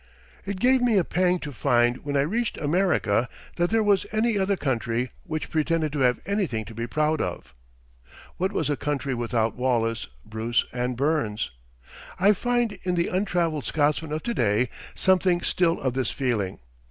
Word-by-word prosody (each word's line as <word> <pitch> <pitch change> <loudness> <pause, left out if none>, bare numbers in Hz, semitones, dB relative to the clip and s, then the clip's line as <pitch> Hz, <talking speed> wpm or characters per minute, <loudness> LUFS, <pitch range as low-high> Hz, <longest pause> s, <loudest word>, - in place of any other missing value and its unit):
It 200 -1 -4
gave 255 +2 +4
me 240 -4 +3
a 185 - +4
pang 180 +2 +1
to 150 - -5
find 120 -1 +2
when 145 -1 -1
I - - +4
reached 220 +11 -1
America 145 - +1 0.3
that 175 0 +2
there 225 0 +2
was 205 -2 +2
any 220 +1 +1
other 195 0 +1
country 120 -3 -1
which 155 -3 -4
pretended 160 -1 0
to 150 - -2
have 125 -2 +3
anything 175 - -1
to 115 - -10
be 115 +2 -4
proud 155 +5 +1
of. - - -5 0.8
What 190 +2 0
was - - -1
a - - +1
country 145 -1 -2
without 115 -2 0
Wallace, 115 -3 0 0.2
Bruce, 110 +2 0
and 125 0 -2
Burns? 140 -7 0 0.7
I 200 +3 +6
find 240 +1 0
in 180 -1 -1
the 170 0 +1
untraveled 175 -6 0
Scotsman 150 +1 0
of 155 +1 -3
to 235 - -1
day 115 - +2 0.3
something 185 -2 +3
still 170 -1 +1
of 130 -2 -1
this 130 -3 0
feeling. 115 -8 -1
150 Hz, 175 wpm, -25 LUFS, 125-185 Hz, 0.8 s, I